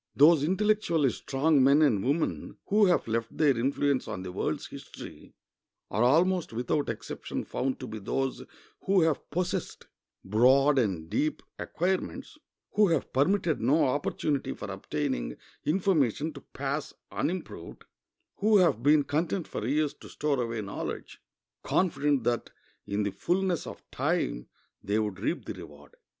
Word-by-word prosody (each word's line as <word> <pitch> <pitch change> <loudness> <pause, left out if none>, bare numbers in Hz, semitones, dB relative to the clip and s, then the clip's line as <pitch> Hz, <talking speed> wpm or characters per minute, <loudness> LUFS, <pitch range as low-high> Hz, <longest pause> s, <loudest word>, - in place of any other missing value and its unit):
Those 150 +1 +6
intellectually 185 - +2
strong 140 +1 +2
men 140 +3 +6
and 110 -10 +3
women 145 +5 -1
who 210 0 +5
have 175 - +2
left 115 0 -2
their 145 -4 +4
influence 135 +2 0
on 100 -4 -5
the 90 - -6
world's - - -2
history - - -11 0.6
are 105 - 0
almost 170 +8 +3
without 125 +5 -1
exception 115 0 -5
found 130 0 -2
to 130 - -6
be 110 -2 -6
those 135 +6 -2 0.4
who 195 -1 +4
have 160 -3 0
possessed 180 +3 -3 0.4
broad 130 +7 +4
and 95 -9 -1
deep 155 - -1 0.2
acquirements; 185 +3 -2 0.3
who 210 -1 +4
have 165 -6 0
permitted 165 +4 +2
no 155 +3 +3
opportunity 145 +1 -1
for - - -6
obtaining - - -3 0.3
information 155 - +1
to 140 - -10
pass 140 +2 -4 0.2
unimproved; 185 +2 -4 0.5
who 215 +1 +4
have 175 - +3
been 145 +2 +5
content 160 +5 -1
for 110 - -4
years 150 +2 +1
to - - -14
store 145 -3 -1
away 115 -2 -2
knowledge, 100 - -6 0.4
confident 145 -7 +1
that 120 0 0 0.4
in 105 +1 -1
the 100 - -1
fullness 180 - -1
of - - -9
time - - -1 0.3
they 100 +2 0
would 105 -4 -2
reap - - -2
the - - -4
reward. 75 0 -13
145 Hz, 145 wpm, -28 LUFS, 120-165 Hz, 0.6 s, Those